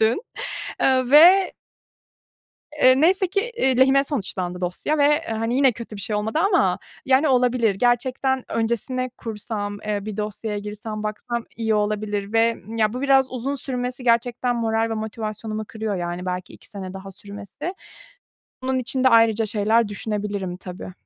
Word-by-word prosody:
dün, 225 - +2 0.6
eee, 255 -1 +2
ve 360 +6 +7 1.3
eee, 255 +1 +6
neyse 370 +4 +4
ki, 395 +3 +1 0.2
eee, 265 - +2
lehime 270 +1 +5
sonuçlandı 190 - -3
dosya 185 +12 -1
ve, 295 +2 +4
hani, 225 +2 -1
yine 270 -2 +5
kötü 230 -1 -9
bir - - -7
şey 210 +2 -2
olmadı 220 +7 -1
ama 375 +3 +2 0.3
yani 270 +3 +4
olabilir. 245 -5 +2
Gerçekten 250 +3 +1
öncesine 235 +3 -1
kursam, 210 -3 -5
eee, 205 -1 -2
bir 215 -1 -5
dosyaya 210 0 -3
girsem 210 +1 -6
baksam 220 +2 -4
iyi 220 -1 0
olabilir 210 -1 -1
ve, 225 +1 +4
ımm, 225 +1 -7
ya 215 -1 +2
bu 250 - -4
biraz 270 -1 +3
uzun 260 +2 -3
sürmesi 250 -1 -4
gerçekten 240 +1 +1
moral 225 0 0
ve - - -1
motivasyonumu 215 0 -4
kırıyor, 220 -2 -3
yani 175 +1 -4
belki 180 0 -4
2 - - -14
sene 195 -3 -7
daha 195 0 -8
sürmesi. 205 - -8 0.9
Bunun 260 0 0
için 255 +1 -1
de - - +8
ayrıca 225 -2 +4
şeyler 215 +1 +2
düşünebilirim 205 -3 -3
tabii. 180 0 -8
225 Hz, 155 wpm, -23 LUFS, 210-255 Hz, 1.3 s, de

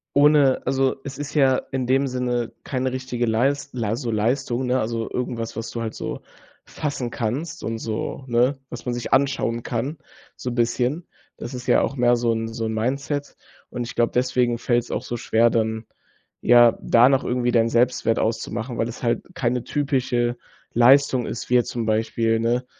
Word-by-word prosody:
ohne, 145 -2 +5
also, 135 0 +1
es 135 -1 -7
ist 145 +1 -6
ja 135 -3 +4
in 130 -2 -2
dem 135 +2 +2
Sinne 125 -2 -2
keine 130 -1 -2
richtige 125 -2 -2
Leist 135 +5 +1
la 110 -3 -1
so 120 -1 -3
Leistung, 120 +3 0
ne? 125 +1 +1
Also 115 +1 -2
irgendwas, 120 -2 -3
was 115 - -4
du 115 - -5
halt 110 -1 -4
so - - -5 0.4
fassen 140 -5 -4
kannst 145 +10 -3
und 115 0 -3
so 115 +4 -4
ne, 125 +3 +2
was 120 - -8
man 125 - -2
sich 120 - -5
anschauen 135 -4 +1
kann, 135 +5 -3 0.4
so 125 - -4
'n - - -4
bisschen. 125 +7 0 0.3
Das 120 - -7
ist 125 -1 -7
ja 125 - +4
auch - - -1
mehr 120 0 +4
so 120 -1 +1
'n 115 0 -2
so 115 0 -4
'n 110 - -2
Mindset. 140 +5 -2 0.3
Und 120 - -4
ich - - -8
glaube, 120 0 +1
deswegen 125 -1 +1
fällt's 120 0 0
auch - - -2
so 120 - -4
schwer, 115 0 +2
dann 110 -1 -1 0.5
ja 120 -1 +6
da 120 +2 +5
noch 135 0 +2
irgendwie 125 0 0
deinen 115 -1 +3
Selbstwert 120 -1 +2
auszumachen, 115 +2 -2
weil 115 - 0
es 120 - -9
halt 120 -1 0
keine 125 -6 -1
typische 125 -4 0 0.4
Leistung 130 +1 +5
ist, 115 - -5
wie - - +3
jetzt 120 -1 +3
zum 115 -2 -3
Beispiel, 115 +1 +1
ne, 120 +2 0
120 Hz, 190 wpm, -23 LUFS, 115-130 Hz, 0.5 s, ja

